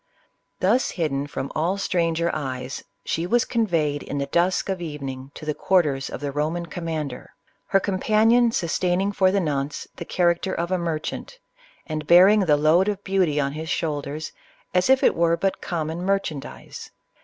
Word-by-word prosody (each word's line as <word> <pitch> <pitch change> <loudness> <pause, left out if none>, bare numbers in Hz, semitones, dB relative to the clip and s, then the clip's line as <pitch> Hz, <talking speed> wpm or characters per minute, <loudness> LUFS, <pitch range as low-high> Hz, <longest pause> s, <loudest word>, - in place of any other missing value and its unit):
Thus 225 +8 +3
hidden 145 -4 -1
from 140 -1 -5
all 170 +5 0
stranger 170 -3 0
eyes, 130 -3 -4 0.2
she 165 +2 -1
was 240 +5 +2
con 230 -2 0
veyed 150 -5 0
in 145 - -5
the 140 - -1
dusk 175 +6 +1
of 190 -2 -2
evening 135 -5 -6
to - - -9
the 155 - 0
quarters 145 -7 +1
of - - -7
the 145 -1 -2
Roman 155 +4 -2
commander; 160 -7 -5 0.3
her 195 - +3
companion 220 +5 +3
sustaining, 180 +1 0
for 190 -2 +3
the 200 +1 +2
nonce, 145 -4 -2
the - - -5
character 175 +2 +1
of 170 +2 -2
a 185 - +1
merchant, 165 - -4 0.5
and 155 -2 -5
bearing 185 +5 +7
the 160 -7 +3
load 160 +6 +4
of 205 -1 -2
beauty 185 -6 +1
on 140 -1 0
his 160 +2 -6
shoulders 150 -2 -3 0.4
as 180 +6 +2
if 265 0 +5
it - - +5
were 170 0 +2
but 195 +1 -1
common 165 0 -3
merchandize. 185 -7 -3
170 Hz, 170 wpm, -24 LUFS, 150-190 Hz, 0.5 s, bearing